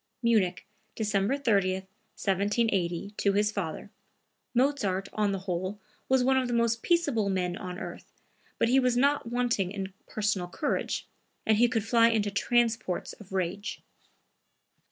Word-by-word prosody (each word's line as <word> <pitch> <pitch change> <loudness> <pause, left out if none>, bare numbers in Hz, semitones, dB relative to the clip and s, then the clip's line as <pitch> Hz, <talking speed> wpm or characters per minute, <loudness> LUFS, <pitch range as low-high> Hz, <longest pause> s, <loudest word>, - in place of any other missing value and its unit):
(Munich, 210 -6 +2 0.3
December 210 +3 +1
30, 200 -9 +2
1780, 195 -1 -1
to 200 - +2
his 210 +1 +2
father. 200 -1 -4 0.6
Mozart, 225 -8 +1
on 210 -1 +1
the 195 - -1
whole, 185 +2 -3 0.3
was 260 -1 +4
one 265 +1 +3
of 260 -1 +1
the 240 - -1
most 235 -1 +2
peaceable 285 -12 +2
men 180 -2 0
on 180 -1 -6
earth, - - -8 0.5
but - - +2
he 260 +3 +5
was 250 -2 +2
not 280 -2 +2
wanting 240 -6 0
in 195 -1 -5
personal 205 -4 -1
courage, 290 - -2 0.4
and 220 -1 +4
he 240 +2 +5
could 225 -4 0
fly 230 0 +5
into 210 -3 +1
transports 225 -2 0
of 200 -3 -15
rage.) 190 +2 -3
210 Hz, 145 wpm, -28 LUFS, 190-235 Hz, 0.6 s, he